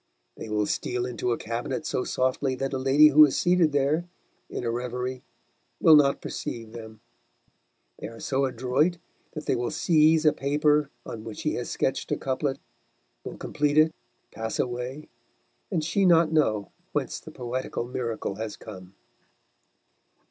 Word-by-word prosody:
They 110 Hz, -, -8 dB
will 105 Hz, -1 st, +1 dB
steal 125 Hz, +3 st, -2 dB
into 125 Hz, 0 st, -2 dB
a 115 Hz, -, 0 dB
cabinet 120 Hz, +3 st, -4 dB
so 125 Hz, -, -1 dB
softly 130 Hz, +1 st, 0 dB
that 135 Hz, +1 st, -3 dB
a 130 Hz, -, -1 dB
lady 140 Hz, +3 st, +6 dB
who 150 Hz, +1 st, +8 dB
is 145 Hz, -, +3 dB
seated 175 Hz, -3 st, +3 dB
there, 145 Hz, +4 st, +1 dB, 0.4 s
in -, -, -5 dB
a 115 Hz, -, -1 dB
reverie, 125 Hz, +1 st, -3 dB, 0.6 s
will 160 Hz, -, +7 dB
not 140 Hz, -2 st, +4 dB
perceive 115 Hz, -6 st, -5 dB
them; 110 Hz, -2 st, -10 dB, 1.0 s
they -, -, -5 dB
are 115 Hz, +1 st, -11 dB
so 135 Hz, 0 st, 0 dB
adroit 130 Hz, +7 st, +1 dB, 0.4 s
that 155 Hz, -1 st, -6 dB
they -, -, +1 dB
will 120 Hz, 0 st, -1 dB
seize 160 Hz, -1 st, +3 dB
a 150 Hz, -, +6 dB
paper 150 Hz, +1 st, +2 dB, 0.2 s
on 110 Hz, -2 st, -7 dB
which 110 Hz, -2 st, -8 dB
she -, -, 0 dB
has -, -, -4 dB
sketched -, -, -1 dB
a -, -, +1 dB
couplet, 135 Hz, +1 st, -2 dB, 0.7 s
will -, -, -7 dB
complete 150 Hz, 0 st, -1 dB
it, 155 Hz, +1 st, +5 dB, 0.4 s
pass 110 Hz, 0 st, -4 dB
away, 125 Hz, +4 st, -3 dB, 0.6 s
and 165 Hz, -4 st, -1 dB
she 195 Hz, +5 st, +1 dB
not 170 Hz, -3 st, +5 dB
know 110 Hz, -10 st, +1 dB, 0.2 s
whence -, -, -2 dB
the -, -, -12 dB
poetical 125 Hz, 0 st, -4 dB
miracle 115 Hz, -5 st, -4 dB
has 110 Hz, -1 st, -5 dB
come. 95 Hz, -3 st, -11 dB
130 Hz, 160 wpm, -26 LUFS, 120-150 Hz, 1.0 s, who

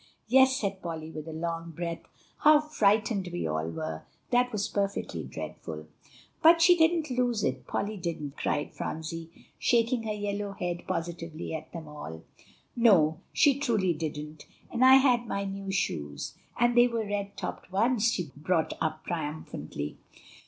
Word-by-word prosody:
"Yes," 260 Hz, +2 st, +5 dB
said 195 Hz, -2 st, -2 dB
Polly 160 Hz, -2 st, -5 dB
with 155 Hz, 0 st, -7 dB
a -, -, -5 dB
long 165 Hz, +1 st, -4 dB
breath; 170 Hz, 0 st, -3 dB, 0.4 s
"how 305 Hz, 0 st, +7 dB
frightened 215 Hz, -9 st, +1 dB
we 175 Hz, -, -3 dB
all 80 Hz, +1 st, -1 dB
were. 80 Hz, -1 st, -4 dB, 0.3 s
That 250 Hz, 0 st, +3 dB
was 210 Hz, -3 st, -1 dB
perfectly 200 Hz, -1 st, -2 dB
dreadful." -, -, -7 dB, 0.6 s
"But 330 Hz, +1 st, +7 dB
she 355 Hz, +2 st, +7 dB
didn't 325 Hz, -3 st, +2 dB
lose 245 Hz, -3 st, +1 dB
it 130 Hz, -2 st, -2 dB
Polly 210 Hz, +1 st, -2 dB
didn't," 160 Hz, -5 st, -4 dB
cried 145 Hz, -, -1 dB
Phronsie, 160 Hz, +1 st, -5 dB, 0.3 s
shaking 235 Hz, 0 st, +2 dB
her 220 Hz, -1 st, -3 dB
yellow 205 Hz, -1 st, -3 dB
head 175 Hz, -2 st, -4 dB
positively 165 Hz, -2 st, -4 dB
at 160 Hz, 0 st, -6 dB
them 165 Hz, -3 st, -7 dB
all. 80 Hz, -, -8 dB, 0.5 s
"No, 180 Hz, -9 st, +5 dB
she 280 Hz, -2 st, +4 dB
truly 215 Hz, -10 st, +2 dB
didn't; 150 Hz, -1 st, -6 dB, 0.2 s
and 245 Hz, +1 st, +1 dB
I 260 Hz, +1 st, +9 dB
had 250 Hz, -3 st, +4 dB
my 200 Hz, -1 st, -2 dB
new 195 Hz, 0 st, -5 dB
shoes, 75 Hz, -, -2 dB, 0.3 s
and 240 Hz, 0 st, +3 dB
they 240 Hz, 0 st, +7 dB
were 230 Hz, -2 st, -2 dB
red 200 Hz, -1 st, -3 dB
topped -, -, -6 dB
ones," 225 Hz, +3 st, +3 dB
she 175 Hz, -10 st, -3 dB
brought 160 Hz, +2 st, 0 dB
up 155 Hz, -1 st, -2 dB
triumphantly. 150 Hz, -, -4 dB
190 Hz, 155 wpm, -29 LUFS, 160-235 Hz, 0.6 s, I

